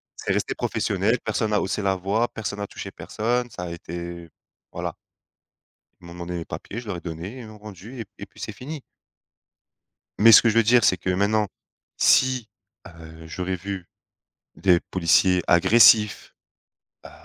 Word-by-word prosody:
c'est - - -3
resté - - -1
professionnel, - - 0
personne 110 -1 -1
n'a 105 - +2
haussé 100 +2 -2
la 95 -1 +1
voix, 100 +6 0
personne 105 -2 -5
n'a 100 - -4
touché - - -8
personne, 120 +2 -2
ça 90 - -7
a 85 - -5
été 85 0 -7 0.4
voilà. - - -5 1.1
Ils - - -13
m'ont 85 - -10
demandé 90 0 -6
les 85 - -5
papiers, 110 - -7
je 115 - -12
leur 90 - -3
ai - - -8
donné, 85 +8 -7
ils 115 - -9
m'ont 110 0 -12
rendu 105 +4 -10
et - - -4
et 100 - -8
puis - - -23
c'est 110 - -5
fini. 140 +7 -8 1.4
Mais 115 +2 +7
ce - - +10
que 115 - +3
je 110 - +1
veux 115 - +6
dire 120 0 +4
c'est 95 - +4
que 90 +1 -3
maintenant, 105 +3 +1 0.5
si, 130 -3 +3 0.4
heu, 80 -2 -12
j'aurais 90 +3 -3
vu 95 -1 -6 0.7
des 90 -3 +3
policiers 90 +1 +2
agressifs, 105 +4 +5 0.7
heu, - - -11
100 Hz, 175 wpm, -24 LUFS, 85-110 Hz, 1.4 s, ce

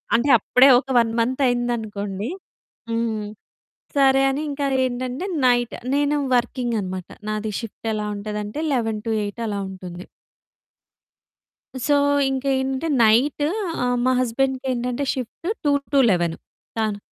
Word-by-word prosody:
అంటే 250 +5 +2
అప్పుడే 250 +5 +5
ఒక 270 - -11
1 225 -1 +2
మంత్ 255 +4 0
అయిందనుకోండి. 220 -3 -2 0.6
హ్మ్ 225 -2 -1 0.7
సరే 270 -1 +5
అని 285 +3 -2
ఇంకా 280 0 -2 0.2
ఏంటంటే 255 +6 -4 0.2
నైట్ 245 -1 +2 0.2
నేను 290 +1 +2 0.2
వర్కింగ్ 245 -1 -1
అన్నమాట 185 -1 -5 0.2
నాది 215 0 -2
షిఫ్ట్ 225 0 -9
ఎలా 210 -1 -2
ఉంటది 210 +1 -4
అంటే 210 +9 -5
11-8 220 -2 -2
అలా 205 -1 -2
ఉంటుంది. 180 -1 -8 1.8
సో, 290 - +2 0.4
ఇంకేంటి 265 0 0
అంటే 325 +5 -3 0.2
నైట్ 255 +7 +3 0.4
ఆహ్, 245 0 +1
మా 255 - +4
హస్బెండ్‌కేంటంటే 255 +1 -1
షిఫ్ట్ 255 +6 -6 0.2
2-11 245 - +2 0.4
తను 215 -2 -1
240 Hz, 115 wpm, -22 LUFS, 215-265 Hz, 1.8 s, అప్పుడే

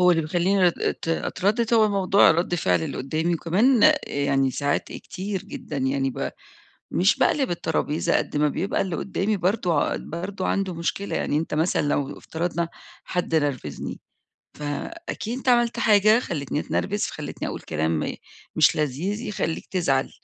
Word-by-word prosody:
هو 180 0 +6
اللي 165 -2 +3
بيخليني 180 +4 +2
أت 165 - -3
أتردد 215 +7 0
هو 215 -1 +5
موضوع 195 -2 +4
رد 170 +2 +1
فعل 90 - +1
اللي - - -4
قدامي، 160 +6 -1
وكمان 205 - +4
يعني 140 -1 +1
ساعات 140 +2 0
كتير 190 0 -5
جدًا 150 - -7
يعني 135 0 0
ب - - -3 0.6
مش 185 +3 +3
باقلِب 270 -9 +2
الترابيزة 160 -2 0
قد - - -2
ما 150 0 +3
بيبقى 195 - -1
اللي 185 -4 -2
قدامي 200 +3 -1
برضه 180 -4 +1
ع - - -1
برضه 185 +4 -5
عنده 195 -2 0
مشكلة، 170 +4 -3
يعني 145 - 0
أنت 160 - -3
مثلًا 160 +4 +1
لو 145 -1 -1
افترضنا 170 0 -3 0.3
حد 180 -2 -1
نرفزني، 140 - -2 0.6
فأكيد 225 - -4
أنت 260 - -1
عملت 240 -1 +3
حاجة 215 +1 +5
خلتني 150 - -3
أتنرفز، 205 +5 -1
فخلتني - - -5
أقول - - -5
كلام 80 0 -1 0.4
مش - - +5
لذيذ 155 - -1
يخليك 165 -9 -3
تزعل، 145 -8 +1
175 Hz, 150 wpm, -24 LUFS, 145-200 Hz, 0.6 s, هو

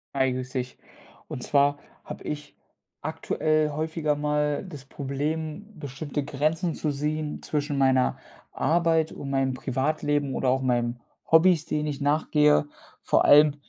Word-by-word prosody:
Hi, 130 -1 +2
grüße 130 +1 -3
dich. 125 0 -6 0.5
Und - - -6
zwar 145 +2 +2 0.3
habe - - -8
ich 150 -1 -6 0.5
aktuell 155 -1 0
häufiger 155 0 -1
mal 150 0 0
das 150 -8 -10
Problem, 150 +6 -4
bestimmte 145 +1 -4
Grenzen 155 +4 -1
zu 155 - -1
sehen 150 +1 -3
zwischen 145 -1 -2
meiner 130 -1 +3 0.3
Arbeit 165 -1 +2
und 140 - -6
meinem 135 -1 +1
Privatleben 140 +2 -1
oder 130 - +1
auch 130 +1 +2
meinen 120 -1 0 0.3
Hobbys, 160 0 +5
denen 150 0 -1
ich 145 -2 -3
nachgehe. 150 0 +3 0.4
Vor - - +2
allem 150 0 +7
145 Hz, 135 wpm, -26 LUFS, 135-155 Hz, 0.5 s, allem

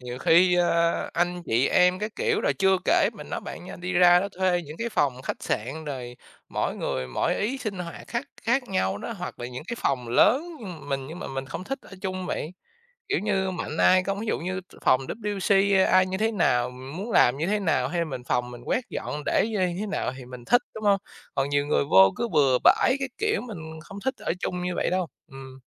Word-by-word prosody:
Nhiều 125 0 -6
khi, 175 +5 +5
a, 170 -1 +3 0.2
anh 175 +1 0
chị 120 +4 +2
em 180 0 +4
các 215 +1 -3
kiểu, 460 -2 +1
rồi - - +2
chưa 190 -1 +4
kể, - - +4
mình - - -10
nói - - -3
bạn - - -8
nha, - - -8
đi 180 +1 -4
ra 175 0 +6
đó 200 - -2
thuê 180 -2 +2
những 150 +2 -9
cái 235 0 -2
phòng 135 - 0
khách - - -4
sạn, 135 +9 -3
rồi 125 -4 -6 0.3
mỗi - - -2
người 65 0 -2
mỗi 60 - 0
ý, 250 +6 -1
sinh 205 -6 -4
hoạt 170 -2 -7
khác 240 +3 -2 0.2
khác 245 +4 +2
nhau 100 - 0
đó, 230 - -5
hoặc 180 -4 -7
là 120 - -5
những 125 +3 -7
cái 235 - -3
phòng 125 -3 -1
lớn 250 - +4 0.5
mình 135 -1 -2
nhưng 160 +4 -8
mà - - -6
mình 135 0 -4
không 180 - -6
thích 270 +6 -4
ở - - -16
chung 185 -1 -3
vậy. 155 - -3 0.6
Kiểu 410 - +1
như, 195 -2 0
mạnh 160 -3 -4
ai 185 +2 +5
không 195 +1 -2
ví 225 - -4
dụ - - 0
như 185 +2 -3
t 185 - -21
phòng 130 - +4
WC, 200 -2 +1
a 190 -1 +5
ai 185 0 +6
như 190 0 -2
thế 220 +2 +1
nào, 125 - +2
mình 130 +4 -9
muốn 205 +6 -5
làm 125 - +5
như 155 +4 -1
thế 210 +2 +1
nào, 185 -5 +1
hay 175 - -3
là - - +1
mình 130 -6 -6
phòng 125 0 -1
mình 120 -1 -9
quét 250 - 0
dọn, 150 - -4
để - - +2
như 215 - -2
nh 180 -1 0
thế 215 - -2
nào 195 -10 -2
thì 130 - -9
mình 125 -1 -10
thích, 245 +2 +4
đúng 215 -1 -7
hông? 200 -1 +4 0.4
Còn 135 0 0
nhiều 145 0 +1
người 145 - +2
vô 95 -6 +6
cứ 235 - -1
bừa 135 - +3
bãi 260 - +5
các 270 -1 -2
kiểu, 435 +1 +1
mình 160 -9 -8
không 200 +3 -9
thích 265 - 0
ở - - -2
chung 180 0 -3
như 180 0 -2
vậy - - 0
đâu, 185 0 0 0.2
ừm. 135 -1 -11
180 Hz, 250 wpm, -26 LUFS, 135-200 Hz, 0.6 s, ra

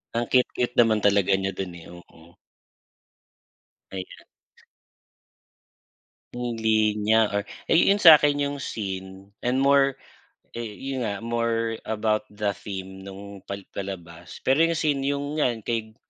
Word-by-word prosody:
Ang 120 +1 0
cute-cute 125 -1 +1
naman 110 -2 +5
talaga 100 -2 +3
niya 95 0 -2
dun 95 -2 -4
eh, 85 - -12
oo. 85 -1 -16 1.6
Ayan. 95 -1 -8 2.1
Yung 120 -2 -4
linya 110 0 +2
or 100 - 0 0.3
eh, - - +5
yu 200 - +4
yun 205 - -4
sa'kin 150 -3 +8
yung 145 0 -2
scene 95 -4 -6
and 130 +2 0
more, 140 -1 +4 0.6
eh 120 - -5
yun 135 -1 -4
nga, 110 -2 -3
more 115 -1 -1
about 110 -1 0
the 105 -1 -2
theme 95 -1 -8
nung 100 +1 -10
pal 100 0 -6
palabas. 90 -3 -8
Pero 135 +4 +3
yung 165 0 +3
scene 150 -3 0
yung 145 +2 -2
nga 135 - +4 0.2
kay 110 -2 -3
110 Hz, 135 wpm, -25 LUFS, 100-130 Hz, 2.1 s, sa'kin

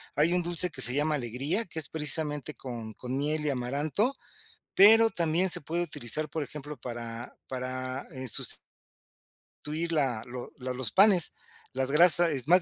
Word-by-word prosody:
hay 155 +4 0
un 180 - -1
dulce 175 +1 +3
que 165 - -2
se 125 +2 +6
llama 150 +1 -2
alegría, 135 - -4
que 170 - -11
es 150 - 0
precisamente 150 -1 +2
con 115 -4 -10
con 125 +4 -9
miel 150 +2 -3
y - - -1
amaranto, 145 - -4 0.6
pero 225 +3 +4
también 170 +1 -2
se - - +9
puede 170 +4 -5
utilizar, 155 -1 -3
por 160 - -6
ejemplo, 150 0 -10
para 120 -1 -10
para, 130 +1 -7
eh, 130 -1 -9
susti - - +3 1.1
tuir 160 +3 -6
la 135 -8 -3
lo 125 0 -10
lo 130 -1 -7
los 125 -3 -2
panes. 195 -4 +4 0.4
Las 130 +1 0
grasa 170 +2 +7
es 135 -2 -2
más 180 +3 +4
150 Hz, 170 wpm, -25 LUFS, 130-170 Hz, 1.1 s, se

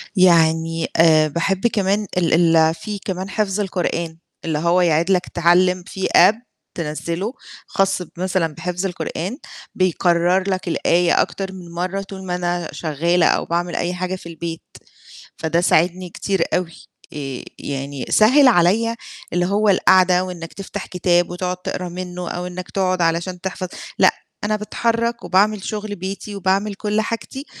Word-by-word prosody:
يعني 165 -2 +3
آآ 155 -2 +5
باحب 185 +7 0
كمان 205 -2 0
ال 165 -1 +3
ال 160 0 +4
في 210 +3 -6
كمان 190 0 -4
حفظ 210 -1 -1
القرآن 170 -4 -2 0.3
اللي 160 -2 -1
هو 170 +2 +3
يعيد 170 +1 +2
لك 180 -2 +2
تعَلِّم 180 +1 +3
في 190 - -2
App 210 - +7 0.4
تنزّله 170 +6 -3 0.3
خاص 195 -1 +1
بمثلًا 180 0 -1
بحفظ 180 +3 -3
القرآن، 180 +4 -4 0.4
بيكرر 180 +1 +2
لك 185 -1 -2
الآية 170 +1 +2
أكتر 190 -1 -3
من 175 -2 -10
مَرّة 180 +3 -2
طول 195 -1 -9
ما 180 -1 -2
أنا 175 -2 -2
شغالة 170 +3 +1
أو - - +1
باعمل 175 +1 -2
أي 175 +1 -1
حاجة 185 +1 -3
في 180 -2 -10
البيت، 165 0 -6 0.8
فده 165 +2 0
ساعدني 180 +1 +2
كتير 190 +1 -1
أوي، 180 -2 0 0.4
آآ، 135 -4 -5 0.2
يعني 140 -1 -5
سهِّل 260 +6 +6
عليّا 225 +3 +3 0.4
اللي 175 0 +1
هو 205 +3 +2
القاعدة 185 -1 +4
وإنك 175 -3 -7
تفتح 195 0 -6
كتاب 175 -1 +1
وتقعد 180 +1 -3
تقرا 180 0 -4
منُه، 180 0 -6
أو 180 0 -4
إنك 180 0 -7
تقعد 185 -2 0
علشان 170 +2 0
تحفظ، 185 0 -4 0.3
لأ - - +6 0.3
أنا 210 +1 +1
باتحرك 230 +2 -1
وباعمل 200 +1 +2
شغل 210 0 -4
بيتي 195 +3 -6
وباعمل 195 +2 0
كُل 210 +1 0
حاجتي 230 +5 -5
180 Hz, 150 wpm, -20 LUFS, 170-195 Hz, 0.8 s, App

